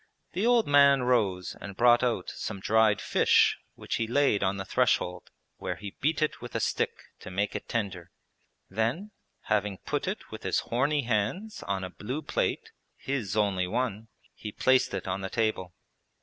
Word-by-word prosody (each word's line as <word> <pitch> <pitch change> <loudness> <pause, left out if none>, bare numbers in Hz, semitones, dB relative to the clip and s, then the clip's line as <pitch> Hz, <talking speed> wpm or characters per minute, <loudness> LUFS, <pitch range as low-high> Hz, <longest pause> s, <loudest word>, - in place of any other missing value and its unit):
The 195 +6 0
old 240 -2 +4
man 140 -2 +6
rose 105 -8 +1
and 100 -1 -8
brought 120 0 +5
out 120 -7 -1
some 100 -3 -5
dried 110 0 +3
fish - - +3 0.2
which - - -3
he 115 - -1
laid 125 -4 +2
on 95 0 +1
the 95 - -4
threshold, 90 0 0 0.3
where - - -4
he 100 -2 -8
beat 155 +2 +1
it 155 - -2
with 120 -1 -9
a - - +1
stick - - 0 0.3
to - - -9
make 100 +3 -1
it - - -6
tender; 95 -6 -3 0.6
then, 130 - -2 0.3
having 105 -2 0
put - - -3
it - - -5
with - - -7
his - - 0
horny 140 +4 0
hands 120 - -1
on 95 -1 -1
a 90 - -5
blue 130 +12 -5
plate - - -1 0.3
(his 115 -8 -3
only 95 -3 +1
one), 115 0 -2 0.3
he 105 - -7
placed 130 +4 +3
it 95 - -5
on 95 +1 -2
the 95 - -4
table. 110 -6 -1
110 Hz, 180 wpm, -28 LUFS, 95-130 Hz, 0.6 s, man